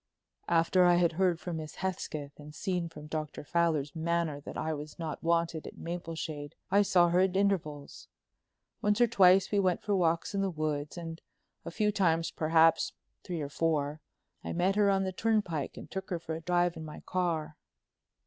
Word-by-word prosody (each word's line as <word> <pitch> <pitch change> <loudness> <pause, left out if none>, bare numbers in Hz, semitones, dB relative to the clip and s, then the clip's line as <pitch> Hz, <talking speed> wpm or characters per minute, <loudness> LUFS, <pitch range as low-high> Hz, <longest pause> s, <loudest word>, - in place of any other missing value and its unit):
"After 170 +2 +4
I 175 0 +6
had 175 -1 +3
heard 175 0 +1
from 175 -3 -4
Miss 155 -1 -7
Hesketh 155 -6 -4
and 150 +1 -11
seen 180 -1 -2
from 150 -2 -11
Dr. 155 -1 -5
Fowler's 155 -3 0
manner 165 -2 -1
that - - -8
I 160 0 -1
was 150 0 -7
not 160 -3 -5
wanted 165 -1 0
at - - -10
Mapleshade, 165 -4 -5 0.2
I 200 +1 +6
saw 175 -3 +4
her 175 +1 +3
at 190 0 +2
intervals. 160 -8 -1 0.7
Once 210 +1 +2
or 240 - +7
twice 195 -4 +5
we 205 - +3
went 185 -2 +1
for 205 -1 +1
walks 170 -1 +1
in 200 - 0
the 195 - +1
woods, 155 -2 -3
and 165 -1 -6 0.4
a - - -4
few 210 +4 +1
times, 165 -5 +1
perhaps 160 +1 +3 0.3
three 175 -4 -4
or 145 - -4
four, 150 -1 -1 0.4
I - - -4
met 180 +3 +1
her 205 -1 +4
on 195 -1 +2
the 190 0 -2
turnpike 195 -9 0
and - - -10
took 190 +1 -5
her 180 - -1
for 165 -1 -6
a 160 - -5
drive 175 0 +1
in 160 - -7
my 155 -1 -9
car." 170 -4 -2
170 Hz, 190 wpm, -30 LUFS, 155-185 Hz, 0.7 s, or